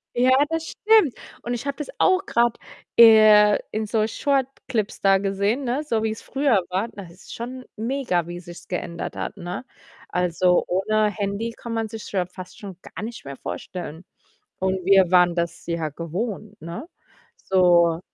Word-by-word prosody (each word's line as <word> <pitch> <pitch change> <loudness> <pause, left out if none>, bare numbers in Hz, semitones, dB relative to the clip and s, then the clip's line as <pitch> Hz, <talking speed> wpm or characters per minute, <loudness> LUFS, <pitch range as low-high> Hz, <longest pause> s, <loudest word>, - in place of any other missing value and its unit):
Ja, 250 +2 +4 0.2
das 325 0 -2
stimmt. 430 - +3 0.3
Und 240 - -3
ich 240 +2 -4
habe 280 - -3
das 295 - -6
auch 375 +1 +3
grad, 235 - +2 0.4
äh, 215 -2 +8
in 215 0 -2
so 215 0 +1
Short-Clips 260 -4 -2
da 195 -1 +5
gesehen, 200 +6 0
ne, 260 +4 -1
so 230 -7 -1
wie's 220 0 -2
früher 270 -7 +1
war. 190 +5 -1
Da 200 -3 -10
es 170 - -13
ist - - -10
schon 250 +2 -7
mega, 225 - -1
wie 175 0 -6
sich's 175 -1 -12
geändert 170 -2 -4
hat, - - -5
ne? 175 +6 -5 0.5
Also, 180 0 +2
ohne 210 +4 +1
Handy 205 +2 -3
kann 235 0 -8
man 225 -1 -1
sich's 220 0 -8
ja 185 -3 0
fast 180 0 -11
schon 195 -4 -9
gar - - -9
nicht 230 -4 -7
mehr 140 0 -7
vorstellen. 175 +2 -7 0.5
Und 190 0 -1
wir 190 -2 +5
waren 180 -1 +5
das 170 -1 -3
ja 170 -2 -2
gewohnt, 200 - -5
ne? 170 - -7 0.5
So, 175 -3 +3
210 Hz, 170 wpm, -23 LUFS, 180-235 Hz, 0.5 s, äh